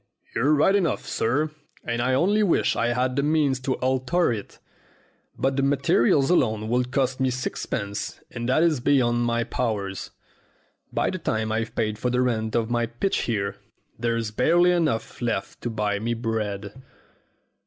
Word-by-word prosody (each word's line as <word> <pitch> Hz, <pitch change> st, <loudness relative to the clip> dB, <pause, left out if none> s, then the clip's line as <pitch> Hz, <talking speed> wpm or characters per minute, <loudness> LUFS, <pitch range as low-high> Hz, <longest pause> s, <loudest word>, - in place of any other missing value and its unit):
"You're 145 Hz, +6 st, +3 dB
right 155 Hz, +6 st, +4 dB
enough, 175 Hz, -8 st, 0 dB
sir, 145 Hz, +7 st, 0 dB, 0.3 s
and 120 Hz, 0 st, -2 dB
I 130 Hz, +1 st, +2 dB
only 200 Hz, +9 st, +3 dB
wish 195 Hz, -5 st, +2 dB
I 115 Hz, -, +1 dB
had 125 Hz, +1 st, 0 dB
the 140 Hz, -, +2 dB
means 145 Hz, -3 st, +2 dB
to 130 Hz, 0 st, -1 dB
alter 130 Hz, +4 st, +1 dB
it. 105 Hz, -3 st, -7 dB, 0.8 s
But 135 Hz, +1 st, 0 dB
the -, -, +2 dB
materials 140 Hz, +1 st, +3 dB
alone 110 Hz, -10 st, +1 dB
would 125 Hz, +1 st, +1 dB
cost 130 Hz, -1 st, 0 dB
me 130 Hz, 0 st, +2 dB
sixpence, 110 Hz, -4 st, -4 dB
and 120 Hz, 0 st, -4 dB
that 145 Hz, +5 st, +3 dB
is 160 Hz, -5 st, +2 dB
beyond 120 Hz, -2 st, +2 dB
my 115 Hz, 0 st, +1 dB
powers. 105 Hz, -6 st, -3 dB, 0.8 s
By -, -, 0 dB
the 185 Hz, -, -4 dB
time 110 Hz, -8 st, -1 dB
I've 115 Hz, 0 st, -2 dB
paid 110 Hz, -2 st, -1 dB
for 125 Hz, -, 0 dB
the 125 Hz, +1 st, +2 dB
rent 110 Hz, -3 st, -1 dB
of 115 Hz, 0 st, 0 dB
my 120 Hz, -1 st, +1 dB
pitch 120 Hz, +12 st, -1 dB
here, 100 Hz, -4 st, -2 dB, 0.4 s
there's 115 Hz, -2 st, -1 dB
barely 175 Hz, +10 st, +4 dB
enough 155 Hz, -12 st, -1 dB
left 120 Hz, -1 st, -2 dB
to 120 Hz, -, -2 dB
buy 105 Hz, -2 st, -1 dB
me 120 Hz, +2 st, -1 dB
bread." 110 Hz, 0 st, -3 dB
125 Hz, 165 wpm, -25 LUFS, 115-140 Hz, 0.8 s, right